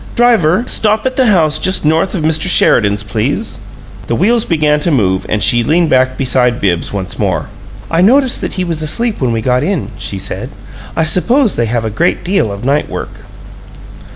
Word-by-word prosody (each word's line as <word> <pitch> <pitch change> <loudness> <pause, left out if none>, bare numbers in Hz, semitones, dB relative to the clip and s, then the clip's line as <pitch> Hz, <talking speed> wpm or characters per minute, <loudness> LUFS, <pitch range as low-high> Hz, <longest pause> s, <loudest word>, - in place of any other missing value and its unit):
Driver! 225 -6 +2
Stop 215 -2 +1
at 260 0 -1
the 260 -2 +2
house 155 -7 +3
just 185 -2 +1
north 160 +6 +1
of 165 - -3
Mr. 160 +2 +2
Sheridan's, 105 - +3
please." 115 - -3 0.5
The - - -1
wheels 230 +3 +1
began 150 -3 +1
to 160 - -2
move, 95 - 0
and 105 -2 0
she 120 +4 +3
leaned 160 +4 +1
back 130 0 +2
beside 125 -2 0
Bibbs 85 -4 -1
once 95 -2 -5
more. - - -2 0.4
"I 165 +1 +1
noticed 255 +6 +3
that - - -5
he 185 - -2
was 165 -3 -3
asleep 220 +8 -1
when 125 -2 0
we 115 -1 -2
got 125 +1 +1
in," 175 +2 -2
she 100 - -5
said. 95 - -5 0.5
"I 160 - +1
suppose 225 - +2
they 120 - -1
have 115 0 -2
a 110 - -3
great 170 - -1
deal 175 - 0
of 100 +4 -7
night 140 +2 0
work." - - -6
155 Hz, 195 wpm, -13 LUFS, 120-190 Hz, 0.5 s, house